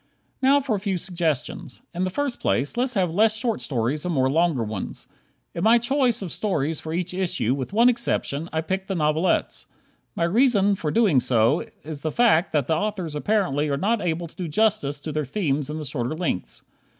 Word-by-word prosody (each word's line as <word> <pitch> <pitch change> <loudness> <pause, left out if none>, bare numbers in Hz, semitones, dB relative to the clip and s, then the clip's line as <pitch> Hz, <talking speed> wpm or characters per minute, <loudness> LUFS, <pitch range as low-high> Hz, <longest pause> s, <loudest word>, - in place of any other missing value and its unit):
Now 275 +2 +5
for 260 -5 -1
a - - -2
few 195 -2 -1
suggestions. 165 -8 -3
In 180 +2 -1
the - - -1
first 275 +6 -2
place, 135 - 0
let's 250 +1 0
have 180 -4 +1
less 215 +3 +3
short 230 -1 -1
stories, 130 +3 -1
and 180 - -2
more 130 -1 +2
longer 160 -5 +2
ones. 105 -3 -6 0.5
In 170 - -3
my 225 +2 +6
choice 245 -2 +1
of 180 - -6
stories 160 -7 -1
for 160 - -7
each 180 +2 -2
issue, 180 - +1
with 135 +2 -4
one 230 +4 +4
exception, 180 - 0
I 160 - -1
picked 190 +4 -3
the 195 - -2
novelettes. 155 +2 0 0.5
My 170 - -1
reason 205 +1 +3
for 165 -6 -2
so - - -3
doing 200 - +4 0.6
is 150 -1 -6
the 155 - -2
fact 205 -6 +3
that 145 -4 +1
the 160 - +1
authors 185 -3 -2
apparently 150 -3 0
are 140 - 0
not 210 +7 0
able 170 0 -1
to 165 - -13
do 180 -3 -4
justice 160 -5 +1
to 155 - -5
their 150 0 -1
themes 145 -2 -1
in 150 - -4
the 155 - -5
shorter 130 0 -3
lengths. 160 - -3
175 Hz, 205 wpm, -24 LUFS, 150-215 Hz, 0.6 s, my